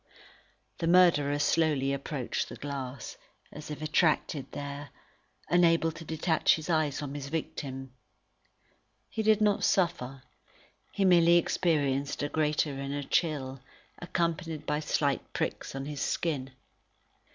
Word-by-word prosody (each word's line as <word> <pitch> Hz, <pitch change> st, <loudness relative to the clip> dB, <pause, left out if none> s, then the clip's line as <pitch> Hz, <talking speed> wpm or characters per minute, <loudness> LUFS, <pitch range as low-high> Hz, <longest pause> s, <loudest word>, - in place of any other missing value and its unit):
The 165 Hz, -, -1 dB
murderer 165 Hz, -5 st, +5 dB
slowly 145 Hz, -2 st, +2 dB
approached 140 Hz, -2 st, -3 dB
the -, -, -8 dB
glass, 135 Hz, -3 st, -6 dB, 0.3 s
as 150 Hz, 0 st, -9 dB
if 150 Hz, 0 st, -6 dB
attracted 155 Hz, -2 st, +1 dB
there, 145 Hz, 0 st, -6 dB, 0.6 s
unable 165 Hz, -1 st, +4 dB
to 165 Hz, +1 st, -10 dB
detach 160 Hz, +1 st, +2 dB
his 160 Hz, +1 st, -4 dB
eyes 155 Hz, -3 st, +1 dB
from 145 Hz, -2 st, -5 dB
his 145 Hz, -1 st, -5 dB
victim. 135 Hz, -4 st, -5 dB, 1.2 s
He 220 Hz, -, -2 dB
did 215 Hz, 0 st, +3 dB
not 210 Hz, -1 st, +3 dB
suffer; 135 Hz, -8 st, 0 dB, 0.7 s
he 195 Hz, -, 0 dB
merely 170 Hz, -2 st, +6 dB
experienced 145 Hz, -6 st, 0 dB
a 145 Hz, -, -1 dB
great 150 Hz, 0 st, +1 dB
inner 140 Hz, 0 st, -4 dB
chill, 135 Hz, -4 st, -1 dB, 0.4 s
accompanied 170 Hz, -3 st, -2 dB
by 150 Hz, 0 st, 0 dB
slight 145 Hz, -2 st, -1 dB
pricks -, -, -3 dB
on 135 Hz, 0 st, -4 dB
his 145 Hz, -1 st, -5 dB
skin. 140 Hz, -6 st, -1 dB
150 Hz, 125 wpm, -29 LUFS, 140-165 Hz, 1.2 s, merely